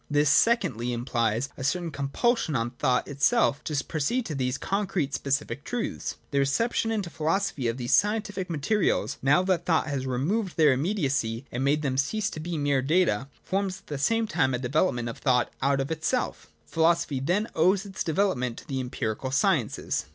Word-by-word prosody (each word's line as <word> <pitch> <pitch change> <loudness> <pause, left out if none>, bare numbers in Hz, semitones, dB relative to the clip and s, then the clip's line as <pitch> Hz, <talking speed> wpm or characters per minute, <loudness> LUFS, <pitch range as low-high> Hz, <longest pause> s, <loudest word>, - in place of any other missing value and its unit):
This, 145 0 +3
secondly, 125 - +2
implies 120 0 -1
a 130 - -6
certain 170 +4 -1
compulsion 145 - 0
on 115 -1 -1
thought 125 0 0
itself 140 0 +2
to 145 -2 -1
proceed 220 - -1
to 160 - -4
these 130 -1 -1
concrete 195 -8 -1
specific 140 -1 -2
truths. 245 +5 -3 0.2
The 140 - +1
reception 225 - +1
into 205 -6 -2
philosophy 160 -3 -1
of 115 +1 -1
these 120 -1 -1
scientific 205 -2 +1
materials, 170 +6 0
now 145 +7 +4
that 185 -2 0
thought 165 -2 +3
has 140 -3 -3
re 125 -1 -1
moved 190 - -1
their 150 -4 +6
immediacy 135 - -1
and 125 +2 -2
made 145 +2 +2
them 130 -2 0
cease 210 +9 0
to - - -6
be 165 +1 -4
mere 145 -2 +1
data, 135 - +2 0.2
forms 190 0 -1
at - - -35
the 145 -2 -5
same 225 +10 +2
time 130 - +1
a - - 0
development 125 -1 0
of 115 - -7
•thought 125 -3 +3
out 135 +1 +2
of 135 +3 -2
itself 160 - -2 0.2
Philosophy, 165 -3 +1
then, 180 - 0
owes 185 +5 +3
its 195 -1 -4
de 160 - -2
velopment 125 - +1
to - - -12
the 135 -2 -2
empirical 125 -1 -3
sciences. 135 - 0
145 Hz, 185 wpm, -27 LUFS, 130-185 Hz, 0.2 s, their